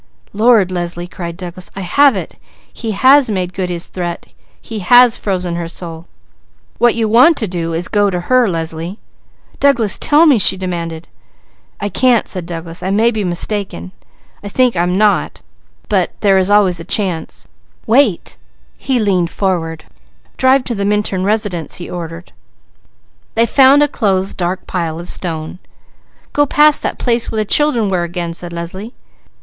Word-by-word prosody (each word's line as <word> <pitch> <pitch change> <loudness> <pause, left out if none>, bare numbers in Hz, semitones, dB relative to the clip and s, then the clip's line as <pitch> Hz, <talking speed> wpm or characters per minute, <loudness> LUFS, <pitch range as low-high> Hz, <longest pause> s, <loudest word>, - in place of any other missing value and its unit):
Lord, 215 -3 +3
Leslie!" 175 -1 -4
cried 170 -1 -7
Douglas, 180 -1 -7
"I 195 - -5
have 275 +8 +3
it! 190 - -6 0.4
He 230 - -6
has 260 +5 +4
made 185 -3 -2
good 185 0 -3
his 175 -1 -2
threat. 175 -2 -5 0.3
He 225 -2 -7
has 245 +5 +5
frozen 180 -3 -3
her 170 -1 -4
soul! 165 -1 -7 0.7
What 240 -1 +3
you 225 -1 0
want 255 +9 +5
to 220 - 0
do 170 -2 -4
is 165 +2 -1
to - - -3
go 205 -1 +2
to 180 -2 -3
her, 250 +3 +2
Leslie!" 165 +2 -4 0.6
"Douglas, 240 -7 +2
tell 300 +3 +4
me!" 280 -8 +4
she 190 - +4
demanded. 170 -3 -5 0.7
"I 205 - -2
can't!" 240 +4 +2
said 180 -3 -5
Douglas. 165 0 -6
"I 185 - -3
may 220 +4 +2
be 215 -3 -3
mistaken. 175 - -3 0.5
I 205 - -6
think 250 +1 +1
I 170 - +1
am 180 +1 0
not, 210 0 +1 0.4
but - - -1
there 195 -2 +4
is 185 +1 0
always 200 -4 +3
a - - -7
chance! 180 -4 -1 0.4
Drive 225 -5 +1 0.5
to 195 - -1
the 200 -1 -2
Minturn 205 -2 0
residence," 205 -6 -1
he 175 - -7
ordered. 170 0 -8 1.0
They 230 +1 +3
found 270 +4 +5
a - - +3
closed 195 -7 -1
dark 180 +1 -3
pile 165 -3 -3
of 175 - -8
stone. 165 0 -3 0.7
"Go 290 0 +2
past 300 +1 +4
that - - -3
place 235 -2 0
where - - -4
the - - -2
children 245 -3 +2
were 185 -2 0
again!" 170 0 -4
said 175 +1 -5
Leslie. 185 +7 -7
190 Hz, 160 wpm, -15 LUFS, 175-225 Hz, 1.0 s, has